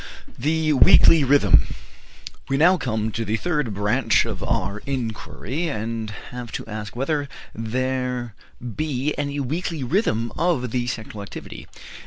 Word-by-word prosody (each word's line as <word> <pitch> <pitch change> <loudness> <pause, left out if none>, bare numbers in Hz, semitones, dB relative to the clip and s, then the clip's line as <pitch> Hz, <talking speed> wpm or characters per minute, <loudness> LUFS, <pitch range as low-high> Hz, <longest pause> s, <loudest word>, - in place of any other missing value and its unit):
THE 155 +3 +1
WEEKLY 160 +1 +7
RHYTHM. 125 - +4 0.7
We 135 - +2
now 175 +6 +6
come 110 -9 -1
to 115 - -2
the 110 0 -1
third 150 -6 -1
branch 110 +5 +2
of 110 -4 -5
our 115 -4 -1
inquiry, 130 +4 -3
and 115 -4 -3 0.2
have 125 -2 -7
to - - -4
ask 105 0 -6
whether 140 +2 -1 0.2
there 125 +1 -2 0.2
be 135 +3 -2
any 145 0 -2
weekly 155 +2 -2
rhythm 120 - 0
of 150 -8 0
the 120 0 -1
sexual 110 -4 -5
activity. 100 - -9
125 Hz, 135 wpm, -23 LUFS, 110-145 Hz, 0.7 s, WEEKLY